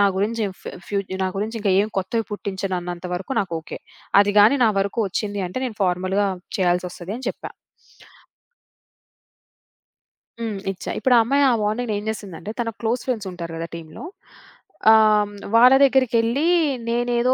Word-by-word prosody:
నా 205 - +6
గురించి 220 +3 0 0.2
ఫ్ - - -23 0.2
ఫ్ - - -13 0.3
నా - - +1
గురించి 220 +3 -3
ఇంకేం 200 0 +2
కొత్తవి 220 +4 -1
పుట్టించనన్నంత 185 -3 -4
వరకు 185 +8 -5
నాకు 190 -4 -5
ఓకే. - - -9 0.4
అది 205 0 +2
గానీ 215 +7 +6
నా 225 - +5
వరకు 200 +4 -3
వచ్చింది 205 +1 -3
అంటే, 185 - -5
నేను 240 -4 -5
ఫార్‌మల్‌గా 185 +2 +1 0.3
చేయాల్సొస్తదని 180 +5 -2
చెప్పా. - - -7 2.9
హ్మ్. 225 -3 -3
ఇచ్చా. 190 - -6
ఇప్పుడు 250 +3 +3
ఆ - - +7
అమ్మాయి 280 +4 +2
ఆ - - +3
వార్నింగ్‌ని 215 +2 -1
ఏం - - -9
చేసిందంటే, 200 -3 -6
తన 235 -1 -1
క్లోజ్ 230 +2 0
ఫ్రెండ్సుంటారు 185 -9 -4
గదా! 165 +1 -4
టీమ్‌లో 160 -2 -10 0.9
ఆహ్, 215 -1 +4 0.2
వాళ్ళ 250 +3 +8
దగ్గరికెళ్ళి 255 0 +2 0.4
నేనేదో 240 +1 +1
210 Hz, 140 wpm, -22 LUFS, 185-235 Hz, 2.9 s, వాళ్ళ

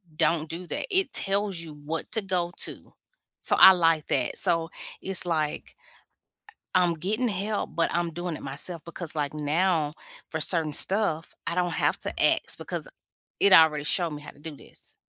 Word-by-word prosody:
don't 160 0 +1
do 175 +2 -6
that. - - -3
It 380 -5 +1
tells 200 -1 +1
you 160 -2 -8
what 165 +2 -4
to 220 - 0
go 180 -3 -2
to, - - -7 0.5
so - - +1
I 190 - +11
like 165 -3 +2
that. 130 -3 0
So 165 -1 +4 0.3
it's 190 -1 -1
like 155 -3 -2 1.0
I 185 - +5
I'm 170 -1 +1
getting 215 +9 -1
help, 205 +1 -3
but 165 - +1
I'm 170 -1 -1
doing 175 0 -4
it - - -10
myself 150 +5 0
because, 170 -1 -4
like, 145 -1 -2
now 155 +1 0 0.4
for 160 - -3
certain 155 -1 +1
stuff, 175 -2 0
I 170 - -2
don't 180 -1 0
have - - 0
to - - -3
ask - - +2
because - - -4 0.5
it 200 - +5
already 150 -3 +6
showed 170 +1 +1
me 150 0 -7
how - - -10
to - - -25
do 155 -1 -7
this. - - -15
170 Hz, 185 wpm, -26 LUFS, 155-185 Hz, 1.0 s, I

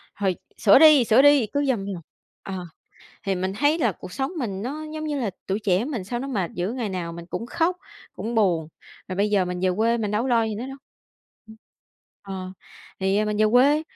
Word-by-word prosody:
Hồi 195 -3 0 0.2
sửa 200 +4 +6
đi, 305 -4 +8
sửa 225 +2 +5
đi! 285 -5 +5
Cứ 285 0 +1
vòng 220 -7 0
vòng" 195 -4 -5 0.4
Ờ, 190 -2 -5 0.6
thì 195 -3 -1
mình 185 +1 -2
thấy 290 +8 +2
là 235 -9 +2
cuộc 180 +1 -11
sống 270 +4 -2
mình 200 -7 -3
nó 295 +6 -5
giống 310 0 -4
như 295 -2 -2
là, 225 -5 -1 0.2
tuổi 195 +1 -1
trẻ 195 0 +1
mình 250 -9 -4
sao 240 +5 -3
nó 270 - -5
mệt 195 -10 -2
dữ, 180 +5 -2
ngày 240 -4 -3
nào 180 -3 -4
mình 170 0 -9
cũng 230 - -5
khóc, 340 +7 0 0.4
cũng 230 +2 -5
buồn, 175 -8 +2 0.4
rồi 185 - -4
bây 205 +2 +1
giờ 200 -3 +3
mình 180 0 -4
về 185 - +2
quê 230 +2 +2
mình 210 -3 -2
đâu 210 +2 0
có 265 - -2
lo 235 -2 +3
gì 220 -1 -3
nữa 225 +4 -5
đâu. 270 0 -8 0.7
Ừm. 220 - -13 0.7
Ờ, 190 -2 -6 0.5
thì, 190 +1 +1
à, 215 - +2
mình 210 0 -2
về 215 - +4
quê, 280 +5 +5
215 Hz, 230 wpm, -24 LUFS, 190-260 Hz, 0.7 s, đi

